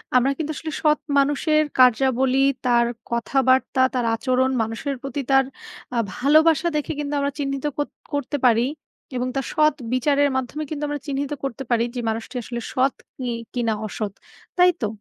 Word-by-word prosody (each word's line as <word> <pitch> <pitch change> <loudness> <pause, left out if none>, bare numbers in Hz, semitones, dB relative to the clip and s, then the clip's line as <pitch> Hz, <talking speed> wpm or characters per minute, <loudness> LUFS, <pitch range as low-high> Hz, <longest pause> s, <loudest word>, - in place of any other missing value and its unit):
আমরা 255 +2 +4
কিন্তু 310 -1 -2
আসলে 315 -1 -5
সৎ 300 -1 +3 0.2
মানুষের 290 +2 +3 0.2
কার্যাবলী, 260 +1 +4 0.2
তার 240 -1 +4 0.3
কথাবার্তা, 260 +2 +2
তার 250 -2 0
আচরণ 255 +2 +1
মানুষের 225 +6 -3
প্রতি 275 +1 -4
তার 270 -1 +5 0.5
আ - - 0 0.2
ভালোবাসা 315 +4 +4
দেখে 300 - -1
কিন্তু 290 0 -3
আমরা 280 0 0
চিহ্নিত 275 0 -2
কর 290 - 0 0.3
করতে 285 0 -1
পারি 235 0 +5 0.5
এবং 250 0 -1
তার 270 - -1
সৎ 305 -1 +4 0.2
বিচারের 285 +2 +3
মাধ্যমে 260 +4 -2
কিন্তু 300 -1 -4
আমরা 290 0 -3
চিহ্নিত 280 +1 -2
করতে 270 0 -4
পারি 235 -1 +3
যে - - -2
মানুষটি 225 +3 -4
আসলে 240 +1 -5
সৎ 260 +1 +2 0.2
কি 255 - -4 0.3
কিনা 235 -3 0
অসৎ। 210 -1 -4 0.4
তাই 360 0 +6
তো? 215 - +1
270 Hz, 165 wpm, -23 LUFS, 250-290 Hz, 0.5 s, তাই